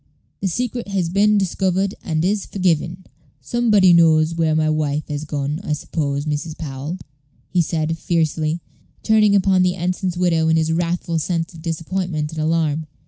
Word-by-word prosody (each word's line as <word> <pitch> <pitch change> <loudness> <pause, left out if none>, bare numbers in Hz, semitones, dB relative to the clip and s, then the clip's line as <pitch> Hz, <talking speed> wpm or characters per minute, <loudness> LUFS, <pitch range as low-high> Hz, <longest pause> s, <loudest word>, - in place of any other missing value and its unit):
the 195 - -1
secret 240 +4 -2
has 190 -4 -1
been 205 +3 +3
discovered, 190 0 0
and 160 0 -1
is 200 +1 0
forgiven." 180 -1 -1 0.3
"Somebody 205 - +3
knows 160 -1 +4
where 165 -2 +1
my 155 0 +2
wife 155 -1 -1
has 145 +1 -4
gone, 145 +1 -3
I 155 - -1
suppose, 145 -1 -2
Mrs. 150 +1 -3
Powell?" 145 +3 -5 0.5
he 180 - +3
said, 160 0 -1
fiercely, 160 -1 0 0.4
turning 215 -2 +4
upon 190 -1 +3
the 180 0 +2
ensign's 180 0 -2
widow 165 -3 +2
in 160 0 +3
his 160 0 +1
wrathful 170 0 -1
sense 165 +2 -2
of 165 - -11
disappointment 165 -1 -3
and 160 -1 -4
alarm. 155 -1 0
165 Hz, 160 wpm, -20 LUFS, 155-185 Hz, 0.5 s, knows